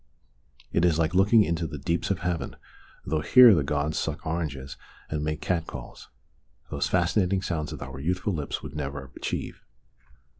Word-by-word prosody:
It 85 - +2
is 85 -3 +3
like 80 0 +1
looking 105 +4 +5
into 85 -2 -1
the 75 - -6
deeps 85 +5 -1
of 100 - -1
heaven, 85 0 -2 0.5
though 75 0 0
here 125 - +8
the 80 - +3
gods 75 +2 -1
suck 80 -2 -3
oranges 75 -5 -3 0.4
and 75 -1 -1
make 75 0 -2
cat 85 -3 -1
calls - - -9 0.6
those - - 0
fascinating 95 +1 +1
sounds 80 -5 -2
that - - -6
our 65 -1 -8
youthful 90 +6 -1
lips 75 -4 -4
would - - -8
never 70 -2 -5
achieve. - - -4
80 Hz, 165 wpm, -27 LUFS, 75-90 Hz, 0.6 s, here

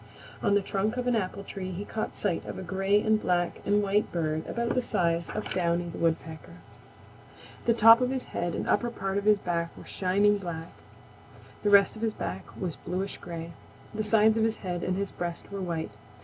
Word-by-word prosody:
On 200 - +3
the 205 - +4
trunk 200 +5 -1
of 250 - -1
an 245 -1 +2
apple 200 -1 -2
tree 190 -2 -6
he 185 +3 -5
caught 220 - -4
sight 190 -5 -1
of - - -5
a 190 - -5
gray 195 +3 +2
and 215 0 +2
black 175 -1 0
and 205 +1 +3
white 205 +1 +1
bird 160 -2 -1
about 235 0 -1
the 255 - +2
size 170 -6 0
of 215 - -4
Downy 175 -1 0
the - - -7
Woodpecker. 160 - -2 1.1
The 230 - +3
top 225 +1 +8
of 250 - +2
his 260 -1 -2
head 175 -1 -1
and - - -3
upper 240 - +2
part 195 -3 -2
of 200 - -7
his 210 -1 +6
back 170 -3 -2
were - - -11
shining 200 +2 +2
black. 170 -3 -6 0.9
The 205 - +1
rest 200 0 +6
of 215 - -9
his 225 -1 0
back 95 +1 -4
was 175 -4 -3
bluish 190 +3 -4
gray. 170 -1 -7 0.4
The 215 - -2
sides 220 +1 +4
of - - +3
his 225 0 +1
head 175 -1 -2
and 185 0 -1
his 200 0 -2
breast 175 +1 -5
were 200 -1 -4
white. 170 -3 -3
195 Hz, 210 wpm, -28 LUFS, 175-215 Hz, 1.1 s, top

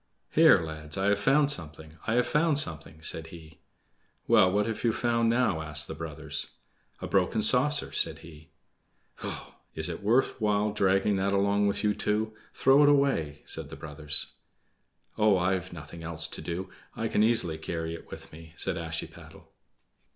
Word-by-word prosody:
"Here - - +6
lads, 80 -1 -5
I 95 +1 +1
have 100 0 +2
found 140 +6 +3
something! 80 - -7
I 115 - +1
have 125 - +3
found 150 -1 +2
something!" 80 - -4
said 80 0 -3
he. 80 -1 -13 0.7
"Well, 90 - +5
what 105 +2 +1
have 115 -1 -4
you 115 - +3
found 115 0 +1
now?" 115 -9 +1
asked 75 -1 0
the - - -5
brothers. - - -6 0.6
"A - - -3
broken 100 +3 +1
saucer," 135 +6 +3
said - - 0
he. 80 -2 -14 0.7
"Pshaw! - - -7 0.2
Is 80 +2 -1
it 85 - -6
worth 115 +4 +1
while 105 0 +1
dragging 95 0 +2
that 100 +1 0
along 100 +1 +2
with 100 - -1
you 105 0 +2
too? 110 +1 -1 0.2
Throw 135 +2 +4
it 145 - +6
away!" 135 - +1
said - - -4
the - - -8
brothers. 75 +1 -1 0.9
"Oh, 105 -2 +4
I've 90 0 -1
nothing 80 0 -9
else 80 -1 -5
to - - -7
do. 90 +2 -5 0.2
I 115 - -2
can 105 - +1
easily 110 -8 +3
carry 80 0 -4
it 85 - -10
with - - -10
me," 80 0 -13
said - - -2
Ashiepattle. 80 -1 -7
95 Hz, 175 wpm, -28 LUFS, 80-110 Hz, 0.9 s, Here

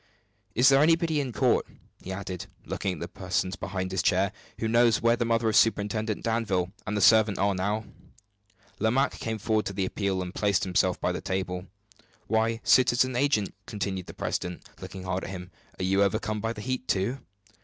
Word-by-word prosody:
"Is 125 +4 +6
there 135 0 +5
anybody 165 0 +3
in 130 -3 -4
court," - - +2 0.3
he 95 - -7
added, 95 -2 -5 0.2
looking 95 - -2
at 85 - -8
the - - -3
persons 95 0 -2
behind 95 -1 -4
his 95 -2 0
chair, 95 +4 +2 0.3
"who 110 - -1
knows 115 -2 +4
where 115 0 +3
the 120 0 -1
mother 115 0 +1
of 110 - +1
Superintendent 110 0 +2
Danville 105 -6 0 0.2
and 105 0 -1
the - - 0
servant 110 0 +5
are 100 0 +2
now?" 105 +4 -1 0.9
Lomaque 125 +6 +1
came 110 -1 -3
forward 110 0 0
at 100 - -8
the 95 -1 0
appeal, 95 -1 -1
and 90 +1 -7
placed 100 -2 +1
himself 90 -1 +1
by - - 0
the - - -4
table. 95 -1 -3 0.6
"Why, 115 +1 +1
citizen 130 0 +4
agent!" 125 -6 +1
continued 95 -3 -3
the - - -10
president, 90 0 -4
looking 95 -1 -8
hard 95 0 -2
at - - -5
him, 90 -1 -7 0.3
"are - - -2
you 95 +2 +2
overcome 105 +2 0
by 115 0 -1
the 105 - -8
heat, 130 +2 -3
too?" 105 +8 0
105 Hz, 190 wpm, -27 LUFS, 95-115 Hz, 0.9 s, Is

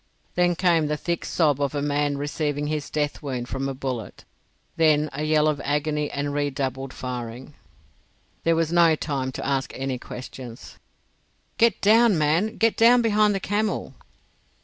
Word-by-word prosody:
Then 175 0 +2
came 170 -4 +2
the 150 0 -1
thick 170 +2 -2
sob 145 -4 +1
of 140 0 -1
a 145 - -1
man 145 0 0
receiving 145 0 -2
his 150 -1 -3
death 150 -1 -2
wound 125 -4 -4
from 135 +1 -2
a 135 - -4
bullet; 130 -4 -5 0.5
then 155 -2 +3
a 140 - -4
yell 155 0 +3
of 150 -2 0
agony 150 +1 -1
and 145 0 -3
redoubled 135 -2 -2
firing. 125 +2 -6 0.9
There 165 0 +3
was 165 0 0
no 170 -2 +5
time 135 -4 -3
to - - -5
ask 135 -1 -1
any 130 -1 -3
questions. 125 -1 -9 0.8
"Get 230 -1 +3
down, 220 -1 +5
man! 165 +9 +1
Get 225 0 +2
down 240 +1 +6
behind 210 -2 +3
the - - -1
camel!" 205 +3 -2
150 Hz, 160 wpm, -24 LUFS, 135-170 Hz, 0.9 s, down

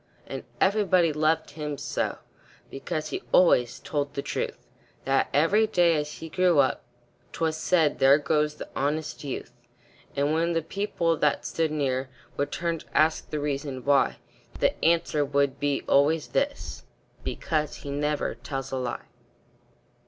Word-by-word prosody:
And - - -6 0.2
everybody 190 -5 +3
loved 155 +2 +1
him 150 -2 -5
so, 145 +2 -2 0.5
Because 155 +2 -4
he - - -3
always 125 -9 +4
told 145 -1 -3
the 140 - -2
truth, - - -3 0.5
That 135 0 +2
every 195 +10 +3
day, 175 -5 +3
as 150 0 -2
he 165 - -8
grew 180 0 +2
up, 135 -2 +3 0.5
'Twas 160 -1 -1
said, 160 -2 +2
"There 135 +1 +7
goes 150 +1 0
the - - -8
honest 150 +3 -2
youth." 130 -3 -5 0.6
And 145 +2 +1
when 165 +2 +1
the 165 -1 0
people 170 -3 -1
that 150 -1 +1
stood 165 -1 0
near 135 -3 -1 0.3
Would 140 - -2
turn 170 -1 -2
to - - -7
ask 155 +1 +2
the 150 - -2
reason 140 -2 -3
why, 140 -1 +3 0.4
The - - +3
answer 165 -2 +3
would 140 -1 0
be 145 -1 0
always 150 +3 +3
this: 285 +1 -2 0.4
"Because 155 -4 -2
he 140 - -4
never 150 +1 -1
tells 135 -2 -6
a 135 - -1
lie." 125 -2 -4
150 Hz, 150 wpm, -26 LUFS, 140-165 Hz, 0.6 s, There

